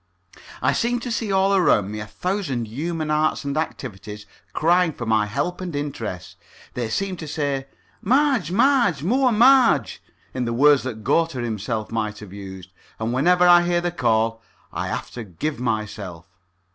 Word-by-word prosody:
I - - +3
seem 240 0 0
to 245 - -5
see 225 -2 -2
all 195 +1 +3
around 105 - +3
me 105 - -5
a 105 - -6
thousand 140 - -3
human 155 +6 -3
arts 155 +1 +1
and 140 -1 -2
activities 105 -9 -5 0.3
crying 175 +1 +2
for 120 - -6
my 110 -2 +2
help 145 - -3
and 175 -4 -5
interest. 115 - -5 0.4
They 120 -2 -3
seem 190 - -2
to 160 - -7
say 140 -3 -2 0.3
"Marge, 255 - +2
Marge, 230 - +3
more 255 +7 +2
Marge!" 230 - +4 0.3
in 125 -1 -2
the 115 - -2
words 145 +3 +5
that 110 -4 -6
Goethe 165 +8 +1
himself 110 -3 -3
might 110 -2 -2
have 105 -3 -11
used. 95 -2 -9 0.3
And 110 +2 -2
whenever 180 +7 +4
I 175 0 +8
hear 175 0 +1
the 175 0 -2
call 115 -6 0 0.3
I - - -3
have - - -4
to 120 - -7
give 115 - -4
myself. 105 -7 -4
145 Hz, 170 wpm, -22 LUFS, 110-180 Hz, 0.4 s, I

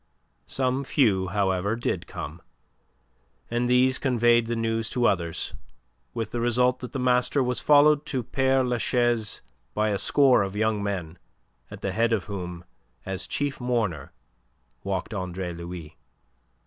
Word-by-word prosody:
Some 130 +1 0
few, 105 -9 +2
however, 95 +1 0
did 120 - -3
come, 80 +3 -7 1.1
and 120 +1 0
these 130 +1 +4
conveyed 120 -3 +3
the 120 - -1
news 115 -1 -1
to 120 0 0
others, 85 -6 0 0.6
with 115 -2 -3
the 120 - -2
result 125 +1 +2
that 125 - -7
the - - -4
master 125 +2 +2
was 125 0 0
followed 150 0 +5
to 130 -3 -2
Pere 135 +2 +2
Lachaise 120 -2 0 0.3
by 110 0 +1
a 100 -2 0
score 135 -6 +4
of 95 0 -3
young 110 0 +1
men 90 -5 -4 0.5
at 100 -1 -10
the 100 - -2
head 115 +3 +1
of 105 - 0
whom 90 -3 -6 0.4
as 95 -1 -3
chief 145 -2 -2
mourner 110 - -1 0.7
walked 95 +2 -3
Andre 90 -2 -4
Louis. 85 -2 -8
115 Hz, 145 wpm, -26 LUFS, 95-125 Hz, 1.1 s, followed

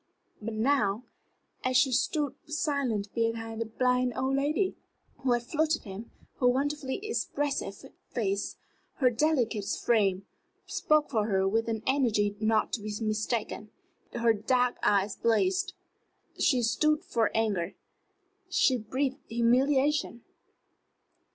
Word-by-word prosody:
But 220 +1 -4
now, 220 -3 +1 0.6
as 255 0 +2
she 260 +1 +4
stood 270 +3 0
silent 275 -9 -1
behind 225 -1 -2
the 230 - -2
blind 250 +2 +1
old 265 +1 0
lady 300 +7 0 0.4
who 260 -2 +1
had 240 0 0
flouted 310 +4 0
her, 200 +1 -7 0.3
her 250 - +4
wonderfully 275 +1 0
expressive 285 - -2 0.2
face, 200 -4 -2 0.4
her 255 -3 +3
delicate 240 -6 +1
frame, 195 -5 +1 0.4
spoke 305 -2 +1
for 215 -4 +1
her 190 -2 +2
with 225 +3 +1
an 220 -1 -2
energy 220 -7 +2
not 215 0 +1
to 225 - -1
be 210 +1 -5
mistaken. 215 -1 -2 0.4
Her 235 -1 +2
dark 245 +4 +1
eyes 200 0 +2
blazed. 370 - +1 0.7
She 255 -6 +3
stood 305 +7 +2
for 225 -1 +1
anger; 200 -5 0 0.7
she 260 -8 +3
breathed 260 +5 -2
humiliation. 260 +2 +2
240 Hz, 120 wpm, -29 LUFS, 215-275 Hz, 0.7 s, she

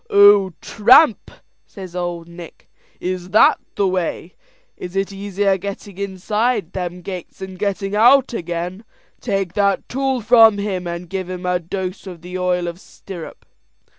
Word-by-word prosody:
"Oh, 200 -2 +6
tramp!" 235 +4 +4 0.4
says 185 -3 -10
Ould 175 -2 -4
Nick; 170 -1 -13 0.3
"is 180 0 -4
that 215 - +5 0.2
the 200 -1 +1
way? 180 -1 -3 0.4
It 180 +1 -8
is 195 0 -1
easier 195 0 0
getting 200 0 -7
inside 200 +1 -1
them 180 -1 -5
gates 180 -1 -7
than 190 0 -8
getting 195 +1 -2
out 245 +4 +5
again. 175 +1 -4 0.4
Take 195 -5 -2
that 200 -1 +1
tool 270 0 -1
from 225 -2 +6
him, 190 -3 -3
and 170 +1 -5
give 185 0 -5
him 180 0 -6
a 180 0 +1
dose 185 +2 -5
of 175 -3 -10
the 180 +1 -8
oil 180 -1 0
of 170 +1 -6
stirrup." 180 -4 -11
190 Hz, 150 wpm, -20 LUFS, 180-205 Hz, 0.4 s, Oh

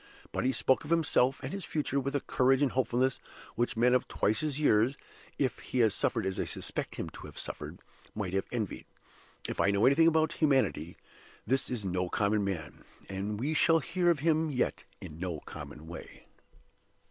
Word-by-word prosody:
But - - -2
he 130 - +3
spoke 130 0 +2
of 145 - -9
himself 140 -5 +3
and 135 - -4
his 195 -1 -4
future 145 -3 -1
with 140 +1 -2
a 140 - +1
courage 130 +2 +3
and 135 - +2
hopefulness 130 0 +1 0.3
which 120 +1 -1
men 125 +2 +4
of 125 - +2
twice 110 +2 +1
his 150 -2 -2
years 125 -2 +3 0.4
(if 130 -4 0
he - - -5
has 110 -3 +4
suffered - - 0
as 95 -1 -2
I - - 0
suspect - - -4
him - - -4
to - - -10
have - - -13
suffered) - - -5 0.4
might 100 -4 -3
have 95 0 0
envied. 110 -6 -3 0.6
If - - -2
I - - +4
know 100 +2 +3
anything 150 +5 +6
of 160 -1 +3
humanity, 110 - +1 0.5
this 135 +4 +1
is 120 -5 -2
no 90 -1 -1
common 105 +1 +1
man; 85 -7 -4 0.3
and 100 +2 -3
we 145 +6 0
shall 165 +1 +4
hear 175 +2 +1
of 165 -5 +2
him 160 0 +2
yet 130 -4 -1 0.2
in 75 0 -9
no 90 -4 -3
common 75 - -9
way. 85 +2 -10
125 Hz, 195 wpm, -31 LUFS, 100-145 Hz, 0.6 s, anything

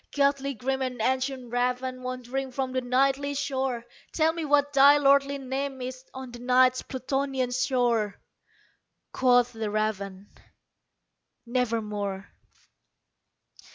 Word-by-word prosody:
Ghastly 280 -1 +1
grim 265 +4 -2
and 255 -2 -3
ancient 260 0 -1
raven 250 +1 -1
wandering 255 +1 -4
from 260 0 -2
the 255 0 -1
Nightly 275 +3 +1
shore 265 -4 -2 0.3
Tell 320 0 +2
me 335 -1 -4
what 290 -1 +2
thy 280 +1 +7
lordly 280 0 +3
name 270 0 -4
is 255 0 -6
on 260 -1 -8
the 240 - -10
Night's 255 +1 +3
Plutonian 265 -1 -2
shore!" 240 -5 0 0.9
Quoth 245 -1 +3
the 220 -1 -3
raven, 205 -2 -3 1.1
"Nevermore." 210 -5 -2
255 Hz, 115 wpm, -27 LUFS, 245-275 Hz, 1.1 s, thy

